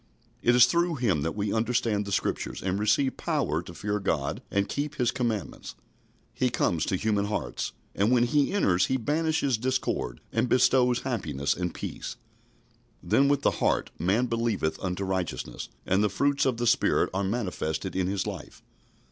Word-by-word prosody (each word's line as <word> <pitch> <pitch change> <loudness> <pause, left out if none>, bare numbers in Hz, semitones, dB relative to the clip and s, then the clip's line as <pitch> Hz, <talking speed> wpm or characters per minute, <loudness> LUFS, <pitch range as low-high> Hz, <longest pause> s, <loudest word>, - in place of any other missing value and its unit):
It 120 - +4
is 125 -1 +8
through 170 +5 +1
Him 105 - +1
that 80 +3 -2
we 105 -1 -1
understand 110 -2 0
the 100 - -6
Scriptures, - - -2
and 95 +1 -1
receive 110 +6 +2
power 140 - 0
to 85 - -10
fear 105 +5 -2
God 70 -8 -1
and 100 0 0
keep 145 +1 -3
His 120 -2 +1
commandments. 115 -7 -3 0.6
He 130 - +1
comes 85 -8 0
to - - +1
human 105 +1 0
hearts, 105 +1 -3 0.2
and 100 +3 +2
when 120 -1 +4
He 140 +4 +2
enters 95 - +2
He 130 - +1
banishes 150 -1 0
discord 125 - -1
and 125 - +1
bestows 125 -1 +4
happiness 80 - -1
and 90 -1 -2
peace. - - -6 0.9
Then 140 - +3
with 140 0 +1
the - - +4
heart - - +1
man 100 +9 +2
believeth 115 -9 -1
unto 95 +1 -2
righteousness, 95 -10 -3 0.2
and 95 +3 +2
the 105 - +2
fruits 140 +7 +1
of 125 -3 0
the 120 - -1
Spirit 115 - +3
are 95 +1 0
manifested 95 -5 -2
in 95 -1 +1
his 100 0 -1
life. - - -7
110 Hz, 175 wpm, -27 LUFS, 95-125 Hz, 0.9 s, is